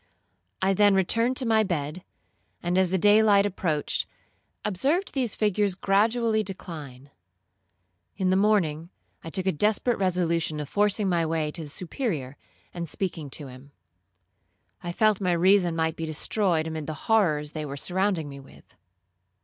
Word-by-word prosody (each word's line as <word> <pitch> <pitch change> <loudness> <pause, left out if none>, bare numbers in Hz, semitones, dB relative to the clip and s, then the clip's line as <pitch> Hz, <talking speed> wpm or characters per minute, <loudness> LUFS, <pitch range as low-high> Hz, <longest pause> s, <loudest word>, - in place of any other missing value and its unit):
I 195 +1 +3
then 205 0 +4
returned 230 +7 +2
to 260 - +1
my 220 -1 +3
bed, 175 -3 -3 0.6
and 175 +1 0
as 185 -1 +3
the 190 - +1
day 205 +3 +5
light 205 -2 +4
approached, 170 -6 -1 0.6
observed 275 - 0
these 255 -6 -1
figures 205 -2 +1
gradually 220 +3 +2
decline. 150 -9 -8 1.1
In 185 -1 +1
the - - +3
morning, 175 -6 +1 0.3
I 165 - -6
took 185 +2 -3
a 190 - +3
desperate 215 +7 +1
resolution 170 -4 0
of 150 - -4
forcing 205 +3 +1
my 170 -2 +1
way 160 -1 -1
to 165 - -6
the 150 - -7
Superior, 160 - -3 0.4
and 170 -2 -5
speaking 165 -6 -3
to 145 +2 -2
him. 130 +2 -13 1.1
I 175 - -4
felt 215 +2 +2
my 180 -2 +1
reason 180 0 +3
might 160 -1 0
be 165 -1 -5
destroyed 160 +1 +1
amid 160 -2 -5
the 155 - -4
horrors 155 -10 +2
they 155 -1 -5
were 140 -1 -6
surrounding 185 0 -1
me 140 -1 -9
with. 135 - -17
180 Hz, 155 wpm, -26 LUFS, 155-205 Hz, 1.1 s, day